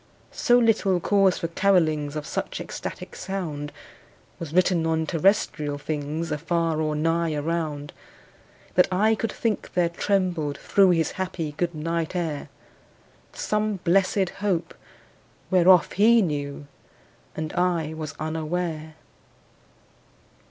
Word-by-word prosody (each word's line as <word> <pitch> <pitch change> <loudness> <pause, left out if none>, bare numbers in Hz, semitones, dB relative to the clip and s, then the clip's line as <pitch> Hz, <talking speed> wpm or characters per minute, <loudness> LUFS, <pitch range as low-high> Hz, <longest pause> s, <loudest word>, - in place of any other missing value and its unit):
So 245 - +3
little 215 -6 +3
cause 195 +1 +3
for 165 - -2
carolings 160 -6 +2
Of 150 -1 -4
such - - -4
ecstatic - - -7
sound 155 -7 -4 0.7
Was 165 -3 -6
written 175 -1 +2
on 160 0 +1
terrestrial 160 -4 +1
things 150 +2 -3
Afar 165 +1 0
or 155 -1 0
nigh 165 +1 0
around, 150 -1 -3 0.8
That 180 - +5
I 210 +4 +3
could 225 +1 -2
think 225 -3 -2
there 175 -2 +3
trembled 175 -5 0
through 195 -2 +3
His 165 -3 +2
happy 165 -4 -3
good 170 +3 -2
night 165 +2 -2
air 160 -5 -3 0.8
Some 210 0 -1
blessed 190 +1 +2
Hope, 190 -5 -1 0.8
whereof 185 -1 +5
he 225 +3 +5
knew, 145 -3 -3 0.7
And 155 -1 -4
I 175 -3 0
was 155 -2 -6
unaware. 155 0 -3
165 Hz, 115 wpm, -25 LUFS, 155-185 Hz, 0.8 s, That